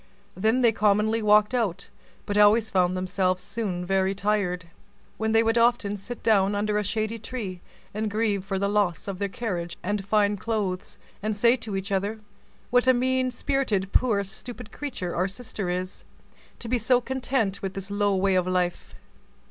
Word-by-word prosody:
Then 220 Hz, +6 st, +2 dB
they 235 Hz, -2 st, +5 dB
commonly 215 Hz, +1 st, +2 dB
walked 210 Hz, +1 st, +4 dB
out, 200 Hz, -6 st, -1 dB, 0.4 s
but 205 Hz, -, -2 dB
always 210 Hz, +2 st, +5 dB
found 185 Hz, -1 st, +2 dB
themselves 185 Hz, 0 st, 0 dB
very 190 Hz, -3 st, 0 dB
soon -, -, -12 dB
tired; 200 Hz, -3 st, 0 dB, 0.5 s
when 220 Hz, 0 st, 0 dB
they 225 Hz, 0 st, +4 dB
would 225 Hz, +1 st, +2 dB
often 230 Hz, -3 st, +2 dB
sit 230 Hz, +5 st, -8 dB
down 205 Hz, -2 st, +3 dB
under 210 Hz, +1 st, 0 dB
a -, -, -1 dB
shady 220 Hz, +2 st, -2 dB
tree, 210 Hz, -6 st, -6 dB, 0.3 s
and 215 Hz, +1 st, -2 dB
grieve 210 Hz, -2 st, 0 dB
for 195 Hz, 0 st, -3 dB
the 200 Hz, +1 st, 0 dB
loss 200 Hz, -4 st, 0 dB
of 195 Hz, -2 st, -4 dB
their 200 Hz, -1 st, -1 dB
carriage 185 Hz, -7 st, -4 dB
and 205 Hz, +1 st, -1 dB
fine 205 Hz, 0 st, +2 dB
clothes, 200 Hz, -3 st, -3 dB, 0.2 s
and 215 Hz, +1 st, -1 dB
say 235 Hz, +3 st, +5 dB
to 225 Hz, -4 st, -6 dB
each 195 Hz, +1 st, -4 dB
other, 200 Hz, +3 st, -1 dB, 0.5 s
"What 245 Hz, +1 st, +3 dB
a 255 Hz, -, +6 dB
mean 255 Hz, +1 st, +1 dB
spirited, 245 Hz, -7 st, -1 dB
poor 215 Hz, -5 st, +3 dB
stupid 225 Hz, +4 st, -7 dB
creature 235 Hz, -12 st, -5 dB
our 180 Hz, -, +1 dB
young 195 Hz, 0 st, -5 dB
sister 215 Hz, -6 st, -4 dB
is, 185 Hz, +1 st, -4 dB, 0.5 s
to 235 Hz, -, -7 dB
be 245 Hz, +1 st, +1 dB
so 245 Hz, +2 st, +3 dB
content 250 Hz, -5 st, -1 dB
within 195 Hz, -1 st, -3 dB
this 195 Hz, +1 st, -6 dB
low 205 Hz, -1 st, +1 dB
way 190 Hz, 0 st, +2 dB
of 185 Hz, -1 st, +2 dB
life!" 180 Hz, -1 st, -1 dB
205 Hz, 180 wpm, -26 LUFS, 190-225 Hz, 0.5 s, a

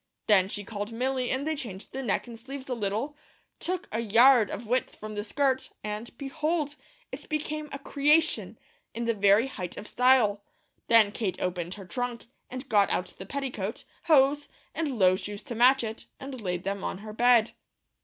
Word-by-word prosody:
Then 190 Hz, -3 st, +4 dB
she 205 Hz, 0 st, -4 dB
called 205 Hz, +1 st, -5 dB
Milly 255 Hz, +2 st, -1 dB
and 265 Hz, +2 st, -1 dB
they 315 Hz, 0 st, 0 dB
changed 215 Hz, -9 st, -7 dB
the 265 Hz, -, -3 dB
neck 225 Hz, -7 st, -1 dB
and 235 Hz, -2 st, -10 dB
sleeves 270 Hz, +3 st, -8 dB
a 255 Hz, -, -2 dB
little, 225 Hz, +6 st, -2 dB, 0.4 s
took 365 Hz, 0 st, -3 dB
a 225 Hz, -, -1 dB
yard 230 Hz, +1 st, +6 dB
of 230 Hz, -, -5 dB
width 250 Hz, +4 st, 0 dB
from 215 Hz, 0 st, -8 dB
the 205 Hz, 0 st, -3 dB
skirt, 265 Hz, +4 st, 0 dB
and 210 Hz, +2 st, -4 dB
behold! 300 Hz, +2 st, -2 dB, 0.4 s
it -, -, -7 dB
became 305 Hz, 0 st, -3 dB
a -, -, -4 dB
"creation," 280 Hz, -, +2 dB, 0.4 s
in 235 Hz, +1 st, -2 dB
the 230 Hz, -, +2 dB
very 205 Hz, +2 st, +4 dB
height 185 Hz, -10 st, -6 dB
of 210 Hz, -, -7 dB
style. 245 Hz, -5 st, +3 dB, 0.5 s
Then 225 Hz, -3 st, +6 dB
Kate 200 Hz, -4 st, -3 dB
opened 180 Hz, 0 st, -3 dB
her 200 Hz, -2 st, -10 dB
trunk, 240 Hz, +5 st, -4 dB, 0.2 s
and 255 Hz, +1 st, -7 dB
got 205 Hz, -4 st, +4 dB
out 180 Hz, -, -1 dB
the 190 Hz, -, -8 dB
petticoat, 245 Hz, -7 st, -4 dB, 0.2 s
hose, 290 Hz, -2 st, +4 dB, 0.2 s
and 290 Hz, -6 st, -2 dB
low 185 Hz, -2 st, +5 dB
shoes 205 Hz, +2 st, -6 dB
to 260 Hz, -, -6 dB
match 250 Hz, +3 st, +5 dB
it, 220 Hz, 0 st, -6 dB
and 270 Hz, -3 st, -7 dB
laid 180 Hz, -3 st, -3 dB
them 200 Hz, 0 st, -3 dB
on -, -, -3 dB
her 215 Hz, -, -7 dB
bed. 235 Hz, 0 st, +4 dB
235 Hz, 185 wpm, -28 LUFS, 205-270 Hz, 0.5 s, yard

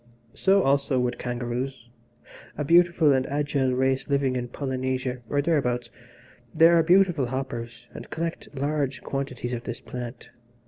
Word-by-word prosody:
So, 195 Hz, 0 st, +3 dB
also, 140 Hz, -1 st, +2 dB
would 125 Hz, -1 st, -1 dB
kangaroos, 120 Hz, +1 st, -4 dB, 0.7 s
a 150 Hz, -, -1 dB
beautiful 170 Hz, -2 st, +5 dB
and 130 Hz, -1 st, +1 dB
agile 140 Hz, -2 st, 0 dB
race 130 Hz, +2 st, 0 dB
living 140 Hz, -2 st, +1 dB
in 125 Hz, -1 st, -2 dB
Polynesia, 130 Hz, -1 st, -3 dB
or 145 Hz, 0 st, +1 dB
thereabouts 125 Hz, -7 st, 0 dB, 0.6 s
they 165 Hz, +1 st, +7 dB
are 170 Hz, -1 st, +5 dB
beautiful 175 Hz, -5 st, +3 dB
hoppers, 120 Hz, -2 st, -5 dB
and -, -, -9 dB
collect 165 Hz, 0 st, -4 dB
large 140 Hz, -2 st, -2 dB
quantities 130 Hz, -3 st, -4 dB
of 120 Hz, 0 st, -5 dB
this 120 Hz, -2 st, -4 dB
plant. 120 Hz, -1 st, -8 dB
135 Hz, 140 wpm, -25 LUFS, 125-150 Hz, 0.7 s, they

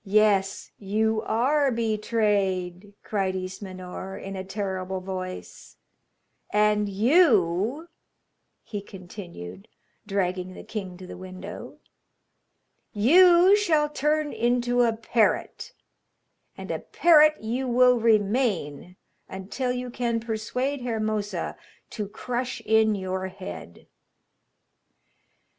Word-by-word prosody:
'Yes, 200 Hz, -1 st, +2 dB
you 220 Hz, +2 st, 0 dB
are 275 Hz, +5 st, +2 dB
betrayed,' 205 Hz, -4 st, -1 dB
cried 195 Hz, -3 st, -1 dB
Ismenor, 185 Hz, 0 st, -7 dB
in 195 Hz, 0 st, -7 dB
a 190 Hz, -, -4 dB
terrible 190 Hz, -1 st, -4 dB
voice; 185 Hz, 0 st, -7 dB, 0.7 s
'and 210 Hz, 0 st, +2 dB
you,' 225 Hz, -, +3 dB, 0.8 s
he 205 Hz, -2 st, -6 dB
continued, 175 Hz, -, -10 dB, 0.4 s
dragging 185 Hz, -2 st, -2 dB
the -, -, -10 dB
king 190 Hz, -5 st, -6 dB
to 185 Hz, -, -10 dB
the -, -, -9 dB
window, 185 Hz, 0 st, -9 dB, 1.2 s
'you 350 Hz, -, +6 dB
shall 315 Hz, -8 st, +2 dB
turn 300 Hz, +1 st, 0 dB
into 245 Hz, +1 st, +1 dB
a 230 Hz, -2 st, +2 dB
parrot, 225 Hz, -, 0 dB, 0.9 s
and -, -, -6 dB
a -, -, -2 dB
parrot 310 Hz, -2 st, +4 dB
you 240 Hz, +4 st, -3 dB
will 250 Hz, 0 st, +4 dB
remain 205 Hz, -, +1 dB, 0.3 s
until 210 Hz, +7 st, -3 dB
you 250 Hz, 0 st, -4 dB
can 235 Hz, -1 st, -1 dB
persuade 235 Hz, +5 st, -3 dB
Hermosa 215 Hz, -3 st, -2 dB, 0.4 s
to 210 Hz, -3 st, -4 dB
crush 245 Hz, +4 st, -4 dB
in 220 Hz, 0 st, +3 dB
your 190 Hz, -1 st, -3 dB
head.' 85 Hz, -, -9 dB
215 Hz, 100 wpm, -25 LUFS, 190-245 Hz, 1.2 s, you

